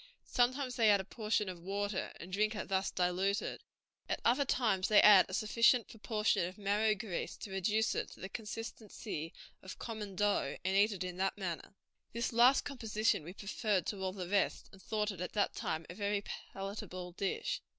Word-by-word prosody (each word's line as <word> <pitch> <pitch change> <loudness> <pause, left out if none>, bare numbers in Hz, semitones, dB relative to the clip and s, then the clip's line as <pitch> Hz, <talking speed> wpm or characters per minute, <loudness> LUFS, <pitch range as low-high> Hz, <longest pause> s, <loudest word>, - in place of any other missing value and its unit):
Sometimes 250 +1 +1
they 225 -3 +5
add 200 -1 +6
a - - -3
portion 215 -1 -1
of 180 -2 -6
water, 200 +2 -2
and 185 +2 -9
drink 215 +2 +1
it 210 - -5
thus 190 0 +1
diluted; 185 +3 0 0.5
at - - 0
other 260 +4 +4
times 215 -8 +1
they 215 - +6
add 200 -3 +8
a - - -7
sufficient 230 +2 +3
proportion 210 -4 0
of 185 - -9
marrow 210 +1 +2
grease 200 -4 -4
to 200 - -8
reduce 210 +4 +1
it - - -2
to - - -14
the 190 - -5
consistency 210 -5 -6 0.3
of 190 - -9
common 215 -4 -6
dough 200 -8 +1
and 190 +1 +1
eat 205 +2 +5
it 190 -2 -3
in 180 -1 -5
that 195 +2 0
manner. 185 -1 -5 0.4
This 235 +1 -2
last 245 +4 +5
composition 225 - 0
we 170 +4 -9
preferred 200 -1 -1
to 200 -2 -4
all 190 -1 -1
the 185 -2 -6
rest, 200 +1 0
and 195 - -15
thought 215 0 -1
it 185 -3 -8
at 180 - -4
that 205 -2 +1
time 160 0 -3
a - - -8
very 205 +1 -1
palatable 195 -3 -6
dish." 200 - -2
205 Hz, 190 wpm, -34 LUFS, 190-220 Hz, 0.5 s, add